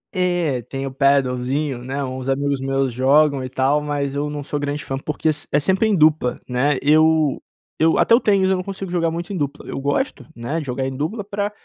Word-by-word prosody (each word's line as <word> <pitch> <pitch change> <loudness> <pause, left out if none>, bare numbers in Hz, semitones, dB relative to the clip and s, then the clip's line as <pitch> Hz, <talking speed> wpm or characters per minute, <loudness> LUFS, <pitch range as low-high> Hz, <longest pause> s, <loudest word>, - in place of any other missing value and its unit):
É, 175 -8 0
tem 135 +4 -5
o 135 - -4
padelzinho, 135 0 +1
né, 135 +3 -3
uns 130 0 -5
amigos 140 0 0
meus 135 -1 0
jogam 140 +2 +3
e 130 - -5
tal, 135 +3 +1
mas 145 -2 -2
eu 145 +1 -2
não 145 -1 -5
sou 145 +1 -3
grande 145 0 -3
fã, 135 - -3
porque 150 +2 -1
é - - +5 0.2
é 145 - +5
sempre 190 +8 +2
em 215 - +2
dupla, 155 -6 +3
né. 130 +3 +1
Eu 155 0 +3 0.4
eu 160 +1 +3
até - - +4
eu 230 - +7
tenho, 200 -5 +2
mas 190 - +2
eu - - +3
não 185 - -3
consigo 195 -1 -6
jogar 170 -2 +1
muito 170 +4 -5
em - - -3
dupla. 145 -1 -4
Eu - - -4
gosto, 145 - -1
né, 120 +8 -3
de 150 - -7
jogar 130 +1 -2
em 135 0 -4
dupla 160 - -3
pra 205 0 -3
145 Hz, 230 wpm, -21 LUFS, 135-165 Hz, 0.4 s, eu